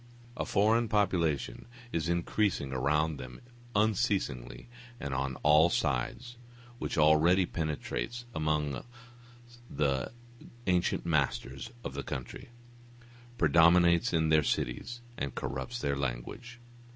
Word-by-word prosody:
A - - -3
foreign 110 +3 +3
population 90 -8 0 0.2
is 80 0 -1
increasing 85 -4 0
around 75 +4 +1
them 60 -1 -9 0.4
unceasingly 100 - 0 0.3
and 70 - -4
on 65 0 -1
all 75 +3 +6
sides, 85 - -2 0.4
which - - -3
already 80 +4 +5
penetrates 80 - -3
amongst 75 - -1 0.8
the 70 -4 0 0.5
ancient 90 -1 +1
masters 75 -6 -1
of - - -5
the - - -3
country, 70 - -7 0.9
predominates 85 +2 +5
in 80 -2 +2
their 80 0 +5
cities 105 - -2 0.2
and 70 - -3
corrupts 70 - -4
their 70 -11 -1
language. 70 - -5
80 Hz, 105 wpm, -30 LUFS, 70-95 Hz, 0.9 s, all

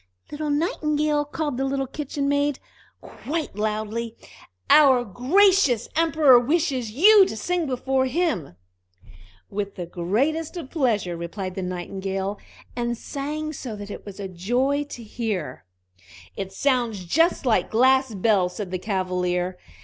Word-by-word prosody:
"Little 300 0 -3
Nightingale!" 300 -1 0
called 295 -2 -3
the 270 - -1
little 270 0 -1
Kitchen 280 +1 -4
maid, 285 -1 +1 0.4
quite 310 -6 -5
loudly, 215 +2 -3 0.5
"our 270 -5 +6
gracious 270 - +3
Emperor 315 -5 +5
wishes 270 -3 0
you 390 - +7
to 220 - -5
sing 350 +5 -1
before 260 0 0
him." 260 - -1 1.0
"With 200 0 -4
the 180 - -5
greatest 265 - -1
pleasure!" 220 - 0
replied 185 +3 -5
the 190 - -4
Nightingale, 190 +2 -4 0.4
and 240 -1 -2
sang 305 +4 -4
so 250 -6 -6
that 205 0 -8
it - - -8
was 200 -1 -10
a 195 - -4
joy 245 +11 0
to 245 -4 -9
hear 215 - -4 0.7
it. 195 - -4
"It - - -19
sounds 235 -4 0
just 325 - +2
like 235 -3 +2
glass 260 0 +3
bells!" 185 -3 +2
said 200 -4 -5
the 185 - -2
Cavalier. 180 -2 -1
245 Hz, 135 wpm, -24 LUFS, 195-290 Hz, 1.0 s, you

